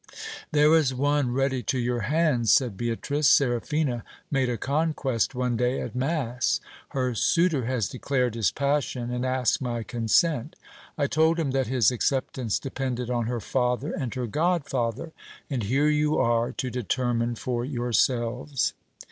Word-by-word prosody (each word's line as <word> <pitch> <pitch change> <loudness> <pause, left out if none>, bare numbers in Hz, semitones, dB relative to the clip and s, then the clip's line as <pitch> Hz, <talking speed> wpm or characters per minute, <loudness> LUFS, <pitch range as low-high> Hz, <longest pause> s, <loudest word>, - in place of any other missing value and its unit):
There 150 +1 +5
is 140 -5 +2
one 145 -1 +1
ready 135 0 0
to 130 - -1
your 120 0 0
hands, 130 -2 +2
said 125 -7 +3
Beatrice. 120 +7 -1
Seraphina 125 0 +2 0.3
made 135 -3 +1
a 120 - -1
conquest 140 -2 0
one 125 -1 0
day 125 +2 0
at - - -5
mass. 125 -2 0 0.3
Her 130 -2 -1
suitor 160 - +2
has 120 -6 0
declared 125 +5 -1
his 115 -3 +1
passion, 140 -3 -1
and 125 0 -2
asked 130 -1 +1
my 120 -3 -2
consent. 120 +5 +1 0.4
I 145 - +1
told 160 +3 +2
him 150 -5 0
that 135 -1 0
his 125 -1 +3
acceptance 125 -2 -1
depended 130 -3 -3
on 120 -2 0
her 120 0 -2
father 125 +5 -1
and 130 -9 -3
her 125 -1 -2
god 160 - 0
father; 120 +5 -2 0.4
and 130 -4 -1
here 135 +8 +2
you 150 0 +2
are 115 0 +2
to 130 - -3
determine 120 0 -1
for 120 +1 -2
yourselves. 125 +1 0
125 Hz, 155 wpm, -26 LUFS, 120-140 Hz, 0.4 s, There